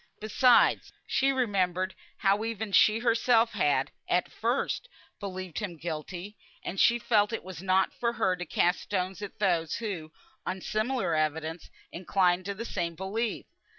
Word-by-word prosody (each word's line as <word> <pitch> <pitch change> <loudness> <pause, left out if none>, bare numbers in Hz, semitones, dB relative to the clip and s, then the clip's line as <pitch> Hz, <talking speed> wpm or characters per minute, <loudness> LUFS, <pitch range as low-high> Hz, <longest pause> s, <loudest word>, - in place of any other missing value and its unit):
Besides 240 +3 +4
she 270 +1 +2
remembered 190 -7 0 0.2
how 200 +1 +2
even 220 -2 -3
she 215 +2 +5
herself 230 0 +3
had, 145 -10 +1 0.2
at 180 0 +1
first, 245 - -1 0.3
believed 185 -4 -5
him 185 -6 -5
guilty; 175 +5 -6 0.3
and 190 - -4
she 235 - +5
felt 215 -3 +2
it 225 - -3
was 185 -3 -8
not 190 0 +2
for 235 -1 -1
her 185 -5 +1
to 180 0 -6
cast 175 +3 +2
stones 190 -1 -3
at 205 - -7
those 170 -6 +1
who, 185 -9 -5 0.3
on 190 - -3
similar 220 -2 -1
evidence, 160 +1 -2 0.2
inclined 180 0 +1
to 200 0 -3
the 230 +4 -5
same 170 -6 -3
belief. 210 +6 -3
195 Hz, 150 wpm, -29 LUFS, 175-225 Hz, 0.3 s, she